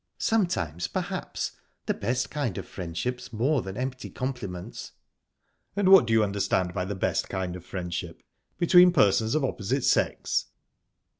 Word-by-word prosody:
"Sometimes, 90 - 0
perhaps. - - -3 0.3
The - - +1
best 125 +4 -2
kind 140 -10 -2
of - - -6
friendship's 95 +9 -4
more 130 +5 +1
than 95 +1 -7
empty 130 0 -4
compliments." 125 -9 -5 0.8
"And 200 -2 +2
what 190 -11 +8
do 115 - +1
you 110 -1 +5
understand 95 -3 0
by 90 -2 -2
the 100 +2 -4
best 95 - -1
kind 95 -2 -3
of 90 - -9
friendship 90 -3 -5 0.3
between 180 0 +6
persons 110 - +3
of 155 -3 +2
opposite 125 +2 -2
sex?" - - +1
110 Hz, 145 wpm, -27 LUFS, 95-135 Hz, 0.8 s, what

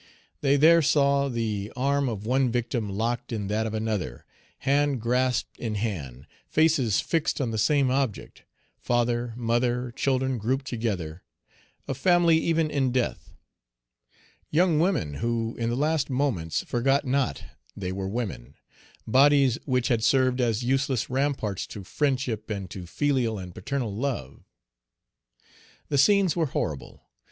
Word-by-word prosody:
They 140 -1 +3
there 165 +3 +6
saw 140 -1 +3
the 110 -4 -3
arm 140 +1 +1
of 105 -2 -5
one 130 +1 +2
victim 120 -2 -2
locked 120 +5 -2
in 105 -4 -3
that 110 +2 0
of 110 - -4
another; 105 - -3 0.4
hand 140 -1 +2
grasped 125 +2 0
in 110 -3 -3
hand; 75 - -4 0.2
faces 145 -9 +2
fixed 165 -2 0
on 125 -5 -1
the 110 - -2
same 135 +3 +3
object; 130 -5 -2 0.4
father, 120 0 0
mother, 120 +1 0
children 130 0 0
grouped 130 +5 -1
together, 100 - -3 0.7
a - - -1
family 175 -3 +4
even 165 -2 +1
in 135 -3 +1
death; 125 -1 -2 1.2
young 165 0 +3
women 160 - +1
who 115 -1 -1
in 115 0 0
the 120 - -1
last 150 +2 0
moments 125 - -1
forgot 135 +4 +1
not 130 - 0 0.3
they 95 -2 -3
were 95 0 -3
women; 105 - -5 0.5
bodies 135 0 +4
which 125 -3 0
had 115 -2 +1
served 130 0 +3
as 115 -1 0
useless 130 -1 0
ramparts 130 -8 -1
to 100 - -8
friendship 125 -1 -1
and 100 -4 -4
to 90 -3 -7
filial 130 - 0
and 90 -2 -8
paternal 125 -5 -3
love. 105 - -4 1.5
The 140 - +1
scenes 190 +3 +4
were 165 -3 +1
horrible. 75 - -4
125 Hz, 140 wpm, -26 LUFS, 110-140 Hz, 1.5 s, there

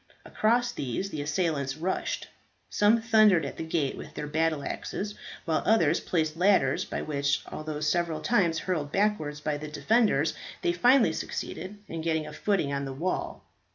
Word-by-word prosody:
Across 240 +3 +1
these 185 - -3
the 150 - -3
assailants 150 -3 -1
rushed. 180 +4 -2 0.4
Some 220 +2 +3
thundered 215 -7 +5
at - - -6
the - - -3
gate 160 -4 -1
with - - -10
their - - -4
battle 155 0 0
axes, 205 +7 -4 0.3
while 160 -2 +1
others 170 -7 +3
placed 160 -3 -1
ladders 180 -7 +3
by - - -4
which, 140 -2 0
although 155 -1 -5
several 160 +1 0
times 175 -4 +2
hurled 155 -6 -2
backwards 160 -8 0
by 150 -1 -1
the 155 - -6
defenders, 220 +9 +2 0.3
they 350 -1 +2
finally 255 -6 +4
succeeded 205 +3 -5
in 165 - -5
getting 160 -1 0
a - - -8
footing 195 -9 0
on 140 0 -2
the 135 - -5
wall. 170 +7 -3
165 Hz, 165 wpm, -28 LUFS, 150-205 Hz, 0.4 s, thundered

